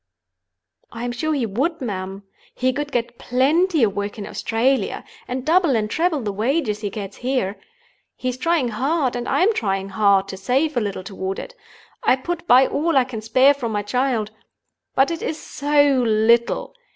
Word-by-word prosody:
"I 230 +1 -5
am 245 - -2
sure 280 +6 -2
he 260 -5 0
would, 270 - -1
ma'am. 195 -5 -5 0.3
He 255 0 +1
could 290 +1 -4
get 240 -1 -2
plenty 300 +5 +2
of 200 -3 +2
work 205 +1 -3
in 205 - -5
Australia, 250 +4 0 0.2
and 255 +1 -4
double 335 -4 +3
and 215 -1 -1
treble 325 -3 +1
the 205 -2 -2
wages 220 0 0
he 205 - -2
gets 200 -1 -7
here. 245 -6 -2 0.6
He 255 - -5
is 250 - -4
trying 320 -3 +1
hard, 265 +4 0
and 245 0 -3
I - - +2
am 440 +4 +4
trying 195 - -1
hard, 195 -1 +3
to 190 - -6
save 265 +10 0
a 240 - +2
little 200 -3 -3
toward 190 0 -4
it—I - - -3
put 345 +6 -5
by 255 +2 +7
all 315 +2 0
I 265 - +5
can 245 -4 -6
spare 255 +6 +5
from 240 -6 -4
my 205 0 -1
child. 230 -1 -1 0.6
But 270 +4 +3
it 335 - -4
is 315 - -3
so 285 -2 +2
little! 230 +1 +2
250 Hz, 185 wpm, -21 LUFS, 210-285 Hz, 0.6 s, by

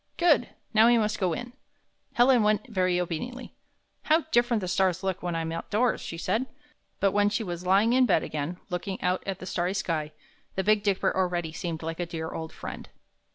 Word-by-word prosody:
''Good! 325 -8 +4 0.3
Now 220 +1 +6
we 240 0 +5
must 215 0 0
go 185 -3 +1
in." 240 +4 -6 0.6
Helen 245 0 +5
went 210 +3 +2
very 185 -5 +1
obediently. 180 +10 -4 0.5
"How 320 +2 +4
different 240 -4 +3
the 185 - -3
stars 185 0 +1
look 190 -1 -2
when 175 -1 -2
I'm 165 0 -2
outdoors!" 215 +8 0
she 165 - -6
said. 215 +9 -1 0.5
But 195 - +3
when 205 +1 +3
she 205 +2 -1
was 175 -2 -5
lying 205 +5 +4
in 255 0 +4
bed 160 - +3
again, 155 +4 -4
look 180 +2 -3
ing 190 -1 -3
out 180 +1 +1
at 195 -2 -2
the 185 - -9
starry 180 +1 -1
sky, 160 -5 -2 0.4
the 190 - 0
Big 210 +1 +3
Dipper 200 -2 +1
already 175 -3 0
seemed 165 -1 -4
like 165 +1 -4
a 175 - -2
dear 160 -1 -5
old 160 0 -5
friend. - - -8
190 Hz, 200 wpm, -27 LUFS, 175-220 Hz, 0.6 s, Now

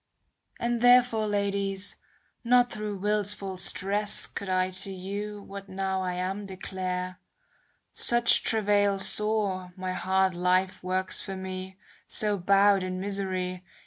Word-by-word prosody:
And 235 0 -1
therefore, 245 -3 +5
ladies, 200 -1 -1 0.5
not 245 0 +4
through 210 -1 -4
will's 205 +1 +1
full 190 -2 -6
stress 205 +3 +1
Could 200 - -7
I 185 0 +1
to 185 +1 -1
you 200 +2 -6
what 200 0 -10
now 190 0 -2
I 180 -1 -2
am 190 +3 -3
declare; 185 -1 -5 0.7
Such 240 0 +4
travail 205 -2 +2
sore 195 -3 +1
my 185 0 -3
hard 190 0 +1
life 185 +1 0
works 185 +1 +1
for 195 - -5
me, 190 0 -7
*^ - - -33 0.3
So 210 -1 +3
bowed 195 +1 +4
in 185 0 -4
misery. 185 -2 -3
195 Hz, 135 wpm, -27 LUFS, 185-205 Hz, 0.7 s, therefore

